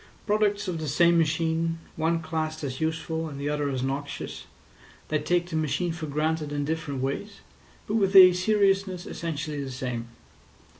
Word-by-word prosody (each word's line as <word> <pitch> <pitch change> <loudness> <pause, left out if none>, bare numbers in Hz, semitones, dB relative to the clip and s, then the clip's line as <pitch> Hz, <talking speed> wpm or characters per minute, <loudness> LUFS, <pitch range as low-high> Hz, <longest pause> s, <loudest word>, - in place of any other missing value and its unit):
Products 210 -1 +1
of 175 -3 -2
the 155 - -4
same 170 +4 +4
machine, 165 +1 +1 0.2
one 165 +1 0
classed 155 -1 -3
as 130 -1 -4
useful 160 0 -2
and 140 -2 -8
the 145 +1 -2
other 150 -1 0
as 130 -2 -2
noxious, 140 +1 -4 0.6
they 155 - +1
take 175 +3 0
the - - -2
machine 160 +3 0
for 165 -1 -5
granted 150 +1 -1
in 145 -1 -1
different 145 -4 -3
ways, 200 +10 -4 0.4
but 205 - -4
with 195 -2 +1
a 185 -1 +10
seriousness 195 -1 +1
essentially 150 -3 -4
the 135 - -5
same. 125 -3 -4
160 Hz, 165 wpm, -27 LUFS, 145-175 Hz, 0.6 s, a